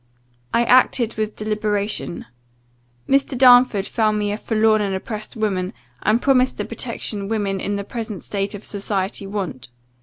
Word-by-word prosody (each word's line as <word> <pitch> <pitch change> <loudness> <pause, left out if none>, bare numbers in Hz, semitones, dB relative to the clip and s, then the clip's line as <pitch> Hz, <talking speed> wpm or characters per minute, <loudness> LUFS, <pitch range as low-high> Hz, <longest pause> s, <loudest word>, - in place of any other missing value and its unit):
I 235 - +3
acted 245 -1 +4
with 215 -1 -3
deliberation. 210 -3 -2 0.8
Mr. 275 -1 +2
Darnford 245 -5 +6
found 215 -1 +1
me 205 -1 -1
a 205 - -2
forlorn 220 -1 +2
and 195 -2 -1
oppressed 215 +4 -6
woman, 200 -3 -1 0.3
and 215 +2 +2
promised 260 -1 +2
the - - -3
protection 200 -2 -4
women 200 -3 -1
in 205 +2 -2
the 200 - -3
present 220 -2 -6
state 200 0 -3
of 205 - -9
society 195 -1 -2
want. 190 - -5
215 Hz, 150 wpm, -21 LUFS, 200-225 Hz, 0.8 s, Darnford